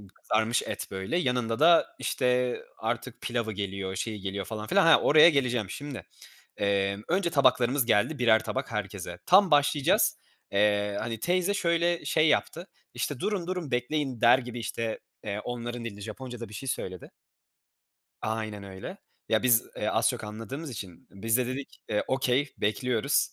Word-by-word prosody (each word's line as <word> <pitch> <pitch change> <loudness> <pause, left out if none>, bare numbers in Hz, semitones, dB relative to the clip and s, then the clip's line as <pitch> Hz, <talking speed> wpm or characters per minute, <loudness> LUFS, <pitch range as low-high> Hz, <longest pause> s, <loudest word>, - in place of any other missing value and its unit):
kızarmış 110 +2 +1
et, - - -5
böyle, 95 - -2
yanında 125 -5 0
da, 170 +2 +6
işte, 125 -1 0 0.2
artık - - -4
pilavı 120 -2 -2
geliyor, 100 -2 -4
şeyi 105 +2 -3
geliyor 100 0 -4
falan 105 +2 -6
filan 195 -2 +4
Ha, 165 - +7
oraya 155 +3 +7
geleceğim. 125 - 0
Şimdi, 145 +2 -6 0.5
emm, 100 0 0
önce 180 0 +1
tabaklarımız 130 -2 +3
geldi, 125 +7 +2
birer 110 -3 +4
tabak 130 -1 -4
herkese. 95 -4 -5
Tam 185 0 +6
başlayacağız. 145 -1 +3 0.3
Eee, 105 0 +2
hani, 115 -2 -4
teyze 180 - +1
şöyle 170 -2 +1
şey 155 0 +3
yaptı, 170 +4 0 0.3
işte, 145 -4 -3
"Durun, 190 -2 -2
durun, 180 -6 -4
bekleyin." 125 0 -1
der 120 +2 +7
gibi, 125 -1 -7
işte, 115 -1 -3 0.2
eee, 105 0 -3
onların 120 +1 -5
dilinde 105 -2 -7
Japonca’da 115 +1 -7
bir - - -12
şey 130 +5 -5
söyledi. 90 -6 -5 1.1
Aynen 110 -2 -3
öyle. 95 -1 -8 0.3
Ya 110 - +2
biz, 120 -3 +5
eee, - - -1
az - - +2
çok - - -5
anladığımız 115 +8 -6
için 100 +1 -9
biz 110 +4 0
de 125 -1 0
dedik, 130 +2 -6
eee, 105 -1 0
okay 130 +1 +1
bekliyoruz, 120 +5 +1
120 Hz, 155 wpm, -28 LUFS, 105-145 Hz, 1.1 s, Ha